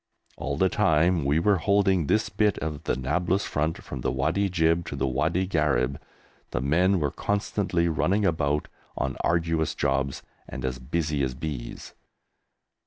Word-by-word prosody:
All 70 0 -3
the 95 - +4
time 85 -4 +2
we 70 +3 +2
were 100 +4 +3
holding 95 -3 +2
this 110 +8 +2
bit 105 -2 +1
of 75 -1 -5
the - - +1
Nablus 90 +9 0
front, 80 +2 -2
from 65 - -6
the - - 0
Wadi 80 +10 0
Jib 85 -1 +2
to - - -4
the 70 - -1
Wadi 80 +8 0
Gharib, 75 -7 0 0.5
the - - -2
men 90 +8 +2
were 75 -3 0
constantly 100 -4 -1
running 90 +7 +1
about 75 -4 0 0.3
on 65 -1 -1
arduous 80 -2 +1
jobs 70 -1 -1 0.3
and - - -5
as 65 0 -3
busy 75 +2 -1
as 65 -2 -1
bees. 70 -3 -6
80 Hz, 160 wpm, -26 LUFS, 70-90 Hz, 0.5 s, the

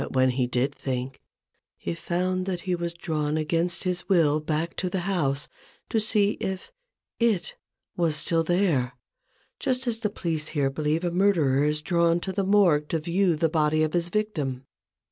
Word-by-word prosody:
But - - -5
when 130 -1 +4
he 125 0 0
did 125 +3 0
think, 130 -1 -4 0.6
he 85 - -4
found 185 - -1
that 180 -2 -2
he 185 0 -2
was 170 -1 -3
drawn 155 -3 -1
against 165 +3 0
his 180 0 -1
will 155 -5 +4
back 155 +2 -2
to 185 - -1
the 185 0 -2
house 150 -7 -1 0.4
to 225 - +2
see 210 -1 +1
if 190 - -4 0.6
// 175 -3 -10
was 165 -3 +2
still 165 +1 +1
there: 160 -8 +1 0.7
just 255 0 0
as 230 -2 -1
the 215 -2 -1
police 165 -6 -2
here 135 -1 +2
believe 155 +4 -1
a 175 - 0
murderer 170 -8 +3
is 150 0 0
drawn 170 -1 +2
to 190 - -3
the 195 +1 -1
Morgue 185 -7 +4
to 165 - +1
view 175 +2 +1
the 165 +2 +2
body 155 0 +2
of 155 - -1
his 175 -1 0
victim. 150 -12 -2
170 Hz, 180 wpm, -26 LUFS, 150-185 Hz, 0.7 s, when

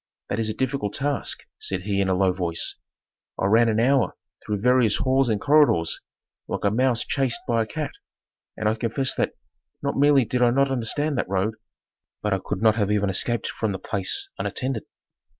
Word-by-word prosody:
"That - - -1
is 110 -1 0
a 110 - -3
difficult 130 -5 -2
task," 140 0 -1
said 95 -1 -2
he 100 0 0
in 95 - 0
a 95 - +2
low 95 0 +2
voice. 85 -2 -2 0.7
"I - - +1
ran 115 +3 +4
an 110 0 +1
hour 130 +1 +2 0.3
through 105 -1 -2
various 125 -2 +3
halls 130 -1 +2
and 105 -2 +1
corridors, 140 - +3 0.5
like - - -4
a 100 - +3
mouse 125 +1 +1
chased 135 -4 0
by 115 -1 +2
a 110 - -2
cat. 155 +4 -4 0.7
And 110 - -1
I 110 - +3
confess 120 +4 0
that, - - -1 0.5
not 140 - -1
merely 140 -2 +5
did 125 +2 -1
I 120 - +5
not 135 +2 +2
understand 135 +3 0
that - - -2
road, 100 +3 0 0.7
but 105 -1 +1
I 95 - 0
could 95 - -3
not 110 -1 +6
have 105 -2 +1
even 100 -1 +1
escaped 120 +5 0
from 110 -3 -2
the - - -3
place 95 0 -2
unattended. 130 -4 -2
115 Hz, 195 wpm, -24 LUFS, 100-130 Hz, 0.7 s, not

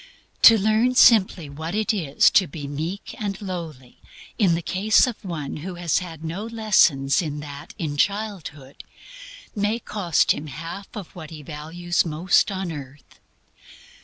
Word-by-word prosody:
To 225 - +9
learn 220 +5 +2
simply 195 -9 +5
what 160 +6 -6
it 215 +1 +1
is 155 -9 +3
to 190 - +4
be 145 -1 -7
meek 160 +8 -5
and 200 -3 -3
lowly, 165 - -7 0.4
in 185 -6 +4
the 170 - -4
case 205 +6 +3
of 245 -4 -6
one 160 -7 -5
who 180 +4 -7
has 175 -2 0
had 165 -3 -9
no 165 +6 -4
lessons 190 -12 +3
in 150 -3 -4
that 145 -1 -10
in 150 -3 -4
childhood, 185 -9 -3 0.7
may 210 +2 0
cost 200 -8 +1
him 155 - -3
half 165 +8 -7
of 200 -6 -8
what 160 -3 -9
he 155 -3 -10
values 165 +4 -2
most 170 +5 +2
on 190 -2 -3
earth. 140 -2 -11
170 Hz, 155 wpm, -23 LUFS, 150-200 Hz, 0.7 s, To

